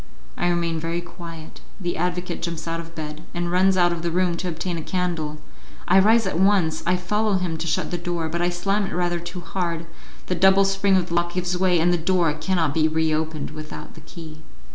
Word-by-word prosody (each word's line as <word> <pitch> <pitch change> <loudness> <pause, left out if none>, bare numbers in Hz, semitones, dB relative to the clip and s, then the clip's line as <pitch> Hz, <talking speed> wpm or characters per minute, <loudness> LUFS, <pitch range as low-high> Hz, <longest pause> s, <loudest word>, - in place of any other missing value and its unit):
I - - 0
remain 170 -2 0
very 165 +2 -2
quiet, 170 -2 -10 0.2
the 175 -2 -2
advocate 180 +1 -2
jumps 170 -1 -4
out 165 0 -2
of 165 0 -9
bed, 150 0 -6
and 175 0 -1
runs 185 +1 +4
out 175 -1 +4
of 170 - -4
the 170 - -1
room 180 0 +1
to 180 - -3
obtain 170 0 -3
a - - -4
candle; 165 -4 -2 0.5
I 190 +2 +6
rise 220 +3 +5
at 185 -3 -1
once, 190 -5 +3
I 180 - +4
follow 210 +3 0
him 180 -3 -1
to 165 +1 -4
shut 160 - -1
the 175 - -2
door, 175 -2 -2
but 170 +2 -2
I 175 - +2
slam 195 +3 0
it - - -5
rather 175 -1 0
too 175 +1 -7
hard, 170 -2 -3 0.4
the - - -1
double 190 +2 +5
spring 195 0 +3
of 180 -1 -1
the - - -4
lock 175 0 +1
gives 180 0 -1
way, 180 -1 +3
and 175 +2 +3
the - - +2
door 170 -2 +2
cannot 160 -1 0
be 155 0 +3
reopened 155 -1 -1
without 155 0 -8
the 160 - -13
key. 155 0 -11
175 Hz, 225 wpm, -23 LUFS, 165-180 Hz, 0.5 s, I